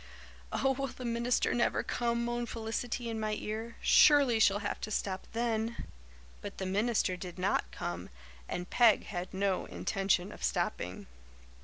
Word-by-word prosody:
"Oh, 270 - +2
will 275 +1 -2
the 255 - -8
minister 235 +1 +1
never 240 - +1
come?" 235 0 -1
moaned 240 0 -2
Felicity 230 +1 -3
in 225 -1 -3
my 215 0 -1
ear. 220 +2 -5
"Surely 280 -6 +6
she'll 200 -2 +5
have - - -3
to - - -4
stop 190 -2 -2
then." 230 0 -1 0.6
But - - -7
the 190 - -3
minister 205 0 +1
did 180 -1 -8
not 185 +2 0
come 85 +1 -5 0.4
and 180 0 -3
Peg 230 -1 +4
had 180 -2 -5
no 190 -1 0
intention 195 -1 0
of - - -11
stopping. 90 +1 -2
220 Hz, 155 wpm, -32 LUFS, 195-235 Hz, 0.6 s, Surely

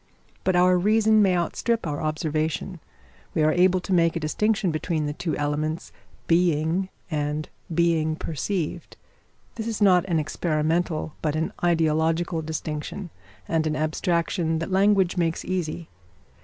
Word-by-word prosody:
But 185 - +2
our 180 0 +5
reason 215 +2 +4
may 190 -3 +3
outstrip 230 +6 -1
our 145 -2 -3
observation. 155 +3 -2 0.6
We 155 - +2
are 155 0 +4
able 185 +1 +4
to 190 - -3
make 165 -1 +3
a - - 0
distinction 200 +4 0
between 155 0 -1
the 145 - -2
two 160 +2 -3
elements 150 +2 -2 0.3
being 170 +2 +2 0.2
and 150 0 -2 0.2
being 165 -2 +2
perceived. 165 +2 -4 0.6
This 225 0 -3
is 225 -2 -3
not 185 -4 +5
an 175 -3 0
experimental 155 +1 -1
but 155 -1 -1
an 160 +1 -1
ideological 165 0 +1
distinction, 155 +3 -5 0.4
and 160 -1 +1
an 155 - -1
abstraction 165 +1 0
that 165 +4 -4
language 195 -1 +3
makes 165 -2 0
easy. 170 -3 -3
165 Hz, 140 wpm, -25 LUFS, 155-180 Hz, 0.6 s, our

